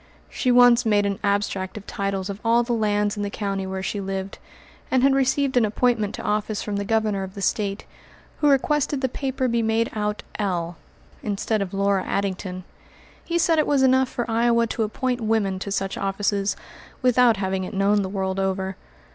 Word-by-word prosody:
She 255 - 0
once 245 0 +6
made 210 -2 +2
an 200 -1 -2
abstract 200 -1 -1
of 205 - -9
titles 195 -1 -3
of 200 0 -5
all 235 +1 +3
the 240 0 -2
lands 210 -2 +1
in 205 - -4
the 205 - -2
county 195 -2 -3
where 190 0 -4
she 200 +1 -2
lived, 195 0 -4 0.5
and 260 -1 +2
had 275 0 +5
received 270 0 +1
an 245 - +5
appointment 220 -1 +1
to - - -7
office 210 0 -1
from 205 -1 -3
the 200 - -1
Governor 215 -2 +1
of 190 +1 -7
the - - -7
State, 200 +1 -1 0.5
who 295 - +4
requested 285 0 +1
the 260 - +2
paper 265 +1 -3
to - - +1
be 235 0 +1
made 225 +1 +1
out 210 -1 -2 0.2
"L." 175 -4 -1 0.5
instead 210 +1 -1
of 190 -2 -3
Laura 200 -1 +1
Addington. 185 -2 -3 0.6
He 340 - -1
said 330 -1 +3
it 305 - +2
was 280 -2 +3
enough 260 0 +4
for 240 - -3
Iowa 235 0 +2
to 225 - -3
appoint 245 +3 -1
women 215 -4 0
to 200 - -5
such 195 -1 -2
offices, 200 0 0 0.5
without 250 -3 +4
having 190 -1 -1
it 185 - -6
known 200 +1 +3
the 190 - -3
world 190 -1 -2
over. 190 0 -2
210 Hz, 195 wpm, -23 LUFS, 195-240 Hz, 0.6 s, once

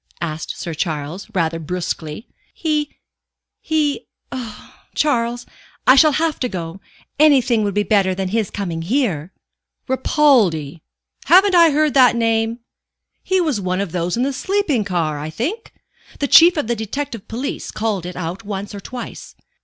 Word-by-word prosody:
asked 160 -2 -4
Sir 170 - -4
Charles, 155 +3 -4
rather 165 -2 0
brusquely. 165 - -4 0.3
"He 300 -2 -2 0.6
he 310 +4 -1 0.2
oh, 235 -5 -8 0.2
Charles, 240 -4 0 0.4
I 255 - +7
shall 305 +1 +6
have 315 +1 0
to 250 - -1
go. 175 -1 -6 0.4
Anything 265 -7 +4
would 200 -2 -2
be 205 - +2
better 195 -2 +2
than 190 0 -2
his 215 -1 0
coming 175 -5 -4
here." 190 - -1 0.6
"Ripaldi? 225 - +2 0.4
Haven't 380 +2 +6
I 340 -2 +7
heard 300 0 +2
the 255 -3 +6
name? 225 0 0 0.6
He 375 0 +1
was 300 - 0
one 185 0 -1
of 200 -4 -3
those 175 +3 -2
in 245 - +1
the 275 +1 -1
sleeping 375 - 0
car, 165 -6 -1
I 150 +2 -5
think? 325 - -4 0.5
The 285 - -1
Chief 335 +4 +7
of 295 - 0
the 235 +1 -1
Detective 230 0 -5
Police 250 +5 -4
called 210 -5 -2
it 180 - -7
out 180 +4 -5
once 205 0 -5
or 200 - -6
twice. 245 +4 -8
225 Hz, 155 wpm, -19 LUFS, 180-280 Hz, 0.6 s, I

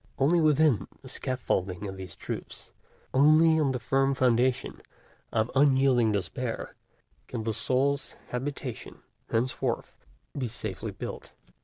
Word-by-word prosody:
Only 160 +6 +3
within 150 -5 +3 0.2
the 130 - -10
scaffolding 105 -8 -2
of 95 - -6
these 95 -1 -8
truths, - - -7 0.4
only 155 +4 +6
on 145 -3 +2
the 130 - -1
firm 135 +2 +1
foundation 125 0 +1 0.5
of 110 +1 0
unyielding 130 -4 +4
despair, 115 +5 -3 0.5
can 115 -3 -4
the 110 0 -1
soul's 135 +5 0
habitation 130 -1 -5 0.3
henceforth 120 +3 -1 0.4
be 130 -3 -2
safely 110 -4 -5
built. - - -7
130 Hz, 120 wpm, -28 LUFS, 115-140 Hz, 0.5 s, only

